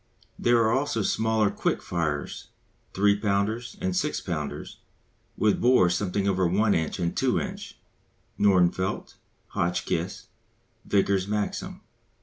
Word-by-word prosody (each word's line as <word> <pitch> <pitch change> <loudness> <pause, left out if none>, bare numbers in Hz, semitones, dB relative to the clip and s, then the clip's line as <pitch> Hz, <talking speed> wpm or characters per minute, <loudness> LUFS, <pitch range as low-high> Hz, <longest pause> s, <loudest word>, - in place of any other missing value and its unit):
There 120 0 +4
are 110 - +2
also 130 -3 0
smaller 110 -1 +1
quick - - -1
firers, 80 -4 -3 0.5
3 100 +1 +4
pounders 105 +3 -1
and 185 -1 -1
6 150 -5 -1
pounders 80 -5 -5 0.6
with 105 -1 +2
bore 120 -8 +5
something 95 +2 -1
over 95 -2 +2
1 100 +4 +2
inch 80 -1 -1
and 85 -2 -2
2 - - +2
inch - - -6 0.6
(Nordenfelt, 95 -2 +2 0.4
Hotchkiss, 85 +1 -2 0.6
Vickers 100 -1 +1
Maxim). 105 0 -3
100 Hz, 120 wpm, -26 LUFS, 90-110 Hz, 0.6 s, bore